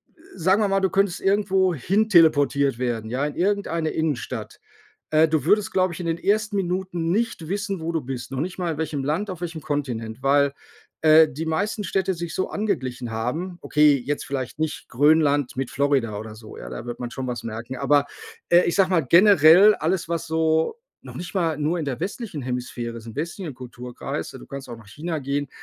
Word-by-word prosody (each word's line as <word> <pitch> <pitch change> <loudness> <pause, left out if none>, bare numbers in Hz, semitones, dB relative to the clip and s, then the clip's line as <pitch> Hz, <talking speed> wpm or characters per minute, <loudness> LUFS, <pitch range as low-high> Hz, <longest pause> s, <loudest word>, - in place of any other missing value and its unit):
äh, 320 - -24
sagen 190 +4 +2
wir 205 - +3
mal, 195 0 +2
du 190 - +2
könntest 195 -1 +1
irgendwo 195 -2 +2
hin 200 - +1
teleportiert 145 - +4
werden, 115 -3 -2
ja, 130 +4 -1
in 150 - -4
irgendeine 180 -4 0
Innenstadt. 155 -6 -3 0.5
Äh, 155 +1 +4
du 155 -1 0
würdest, 205 +3 +2
glaube 185 -2 +1
ich 160 - -9
in 175 - -4
den 165 0 -1
1. 210 +1 0
Minuten 180 -2 -2
nicht 220 -7 -1
wissen, 200 -1 -2
wo 165 +1 -3
du 160 - 0
bist, 125 0 -6
noch 135 - -2
nicht 180 +4 -4
mal 170 -4 -2
welchem 150 -3 -2
Land 170 +8 -1
auf 180 - -7
welchem 165 -2 -4
Kontinent, 120 -6 -3
weil, 140 0 +3 0.5
äh, 160 0 +7
die 155 +5 -5
meisten 205 +6 -1
Städte 190 +1 0
sich 170 -1 -6
so 185 - -2
angeglichen 130 - -2
haben. 160 +11 -3
Okay, 150 -1 +4
jetzt 145 +2 -2
vielleicht 135 0 -4
nicht 155 -2 -3
Grönland 145 -1 +3
mit 135 -2 -3
Florida 135 -7 0
oder 110 0 -8
so, 110 -1 -12
ja? - - -8
Da 115 - -7
wird 120 0 -5
man 120 -1 -4
schon 130 -1 -4
was 120 -3 -4
merken. 115 +3 -6
Aber, 145 +1 +2 0.4
äh, 175 +1 +7
ich 170 - 0
sage 190 -2 +3
mal, 165 -7 +2
generell 185 +2 +7
alles 170 +2 -1
was 170 -1 -2
so 160 - +1 0.3
noch - - -11
nicht 175 +3 -7
mal 165 -5 +1
nur 155 +4 0
in 160 - -2
der 130 -3 -4
westlichen 190 - -4
Hemisphäre 125 -2 -4
ist 115 0 -10
im 115 - -9
westlichen 165 0 -4
Kulturkreis, 125 -1 -6
ja, - - -9
du - - -12
kannst 135 -2 -8
auch 120 - -7
nach 110 -3 -16
China 155 +7 -4
gehen. 140 +1 -2
160 Hz, 210 wpm, -23 LUFS, 130-185 Hz, 0.5 s, äh